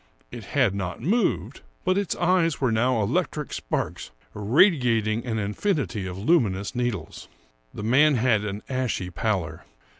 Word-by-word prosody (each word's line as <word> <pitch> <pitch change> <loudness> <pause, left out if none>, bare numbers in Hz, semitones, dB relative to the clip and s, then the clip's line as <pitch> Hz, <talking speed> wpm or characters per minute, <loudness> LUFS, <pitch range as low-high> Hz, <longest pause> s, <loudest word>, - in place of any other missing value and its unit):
It 115 - -8
had 125 -8 +4
not 95 -3 -4
moved, 220 - 0 0.2
but 185 0 +2
its 200 -2 -1
eyes 175 -3 +2
were 130 -4 +1
now 115 0 +2
electric 150 - -2
sparks, - - -3 0.2
radiating 115 - +2
an 110 -2 -1
infinity 110 - -1
of 90 0 -6
luminous 100 - +1
needles. 120 -10 -3 0.4
The 105 - -7
man 140 +6 +4
had 115 -3 +2
an 105 0 -5
ashy 130 -8 -2
pallor. 85 -3 -2
115 Hz, 140 wpm, -25 LUFS, 100-150 Hz, 0.4 s, had